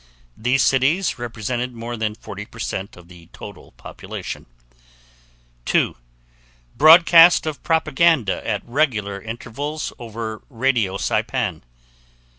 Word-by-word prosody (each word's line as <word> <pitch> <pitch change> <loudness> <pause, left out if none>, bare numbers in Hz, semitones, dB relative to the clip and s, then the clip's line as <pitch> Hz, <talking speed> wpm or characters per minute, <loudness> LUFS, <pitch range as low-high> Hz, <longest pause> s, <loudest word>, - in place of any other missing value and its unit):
These 125 +4 +1
cities 140 +5 +1
represented 120 +1 -4
more 115 +1 -6
than 110 -2 -3
40% 105 -2 -7
of 90 -1 -15
the 85 -2 -16
total - - -12
population. - - -8 1.2
2. - - +1 0.8
Broadcast 165 +4 +7
of 155 -4 -4
propaganda 160 - +2
at 105 -2 -2
regular 110 -7 -1
intervals 120 +8 -5
over 110 -2 -6
radio 115 -6 0
Saipan. - - -2
120 Hz, 95 wpm, -21 LUFS, 110-145 Hz, 1.2 s, Broadcast